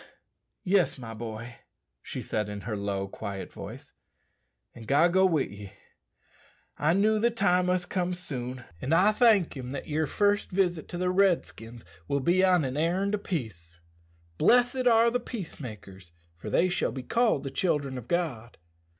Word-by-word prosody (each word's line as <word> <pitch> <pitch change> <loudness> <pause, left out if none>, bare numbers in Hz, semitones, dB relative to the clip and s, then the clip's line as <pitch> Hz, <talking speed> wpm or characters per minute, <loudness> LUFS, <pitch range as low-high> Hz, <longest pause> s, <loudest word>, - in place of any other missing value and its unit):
"Yes, 190 -4 +2
my 115 -3 -8
boy," 115 +1 -7 0.4
she - - -6
said 105 -1 -2
in 105 -1 -6
her 115 - -5
own 100 -1 -4
low, 100 -1 -2
quiet 95 0 -7
voice; - - -9 0.8
"and 115 -2 -12
God 160 +5 +4
go 190 0 +5
with 160 -6 0
ye. 100 0 -10 1.0
I 150 +3 +2
knew 215 +3 +3
the 235 +2 +3
time 180 -5 +2
must 180 -1 -1
come 180 -1 -1
soon, 130 -7 -6 0.2
an' 140 - -1
I 190 +5 +5
thank 215 -7 +3
him 130 -1 -6
that 140 - -6
your 155 0 0
first 205 +4 +1
visit 180 -4 0
to 175 - -6
the 180 0 0
Redskins 165 - 0 0.2
will 140 - 0
be 175 +7 +2
on 180 -5 +4
an 130 +2 -3
errand 185 +6 0
o' 210 - 0
peace. 100 - -6 0.6
'Blessed 245 +1 +3
are 230 0 +5
the 245 - 0
peace 230 -7 -7
makers: 95 - -10 0.2
for 85 - -8
they 180 - +3
shall 180 - 0
be 130 - -6
called 230 - +1
the 135 - -5
children 145 -4 -1
of 120 - -13
God.'" 135 -10 -2
160 Hz, 175 wpm, -28 LUFS, 120-190 Hz, 1.0 s, go